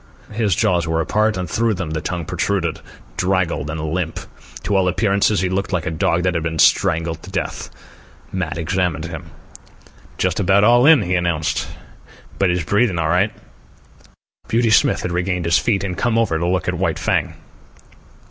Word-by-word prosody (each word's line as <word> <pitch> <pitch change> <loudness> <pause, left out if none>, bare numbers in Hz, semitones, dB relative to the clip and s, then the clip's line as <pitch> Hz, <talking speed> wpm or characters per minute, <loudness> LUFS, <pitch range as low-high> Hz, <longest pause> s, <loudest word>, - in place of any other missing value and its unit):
His 105 -4 0
jaws 85 -2 +1
were 80 0 0
apart, 105 +5 +1
and 90 -1 -3
through 115 +5 0
them 90 -4 -4
the 80 0 -2
tongue 90 -3 -4
protruded, 85 -1 -1 0.4
draggled 90 -5 0
and 80 +1 -4
limp. 80 +2 -3 0.4
To 100 - -1
all 95 -1 +3
appearances 100 +1 +1
he 95 - 0
looked 95 +2 -2
like 85 -4 -1
a - - -2
dog 85 +2 0
that 90 -1 +1
had 85 - -1
been 80 0 -3
strangled 80 +1 +2
to 95 - -11
death. 95 -3 -4 0.6
Matt 90 -4 -3
examined 85 -1 -1
him. 80 -1 -8 0.9
"Just 95 +1 0
about 100 +1 +3
all 120 +4 +5
in," 155 -8 +6
he 90 - -2
announced; 85 -3 0 0.7
"but 95 - +3
he's 90 -2 0
breathin' 100 0 +1
all 80 -1 0
right." 90 +5 +2 1.2
Beauty 115 0 +1
Smith 105 - +3
had 90 - -2
regained 90 0 -1
his 85 -1 +3
feet 105 -5 0
and 95 -2 -3
come 115 +3 0
over 100 -9 +1
to 85 - -1
look 90 -1 -1
at - - 0
White - - -1
Fang. - - -1
90 Hz, 180 wpm, -20 LUFS, 85-100 Hz, 1.2 s, in